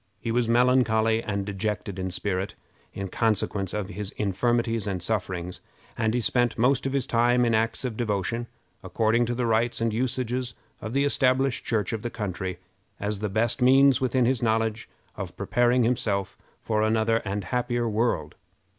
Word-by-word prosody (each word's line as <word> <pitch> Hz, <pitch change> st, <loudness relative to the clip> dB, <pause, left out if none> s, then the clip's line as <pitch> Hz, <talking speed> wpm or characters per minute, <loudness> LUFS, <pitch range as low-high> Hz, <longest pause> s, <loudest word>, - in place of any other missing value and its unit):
He 115 Hz, -, -3 dB
was 120 Hz, 0 st, +1 dB
melancholy 115 Hz, -2 st, +3 dB
and 100 Hz, -3 st, -3 dB
dejected 100 Hz, -1 st, -3 dB
in 95 Hz, 0 st, -2 dB
spirit, 95 Hz, +1 st, -2 dB, 0.4 s
in 100 Hz, 0 st, -5 dB
consequence 105 Hz, -2 st, 0 dB
of 105 Hz, -2 st, -3 dB
his 105 Hz, 0 st, -4 dB
infirmities 115 Hz, +2 st, 0 dB
and 95 Hz, -2 st, -2 dB
sufferings, 90 Hz, -2 st, -3 dB, 0.3 s
and 110 Hz, -1 st, 0 dB
he 125 Hz, -, +1 dB
spent 120 Hz, 0 st, +2 dB
most 130 Hz, +3 st, +2 dB
of 135 Hz, -, -3 dB
his 140 Hz, -2 st, 0 dB
time 120 Hz, +1 st, +3 dB
in 115 Hz, -, +2 dB
acts 115 Hz, +3 st, 0 dB
of 120 Hz, -3 st, -3 dB
devotion, 115 Hz, +1 st, -1 dB, 0.4 s
according 110 Hz, +4 st, +1 dB
to 120 Hz, -, -1 dB
the 125 Hz, 0 st, -1 dB
rites 115 Hz, +1 st, +1 dB
and 115 Hz, -1 st, 0 dB
usages 125 Hz, 0 st, -2 dB, 0.3 s
of 110 Hz, -, -5 dB
the 140 Hz, +1 st, +2 dB
established 135 Hz, -2 st, +1 dB
church 110 Hz, -4 st, 0 dB
of 110 Hz, -, -3 dB
the 120 Hz, -, -3 dB
country, 95 Hz, -5 st, -4 dB, 0.4 s
as 105 Hz, 0 st, -2 dB
the 105 Hz, 0 st, -2 dB
best 115 Hz, +5 st, 0 dB
means 135 Hz, +1 st, +5 dB
within 130 Hz, -1 st, +2 dB
his 125 Hz, -1 st, +1 dB
knowledge 110 Hz, -1 st, 0 dB, 0.3 s
of -, -, -6 dB
preparing 120 Hz, +1 st, +2 dB
himself 105 Hz, -5 st, 0 dB, 0.3 s
for 110 Hz, -1 st, 0 dB
another 110 Hz, +1 st, +2 dB
and 100 Hz, -2 st, -3 dB
happier 120 Hz, +3 st, -1 dB
world. 115 Hz, +2 st, 0 dB
115 Hz, 170 wpm, -26 LUFS, 105-120 Hz, 0.4 s, means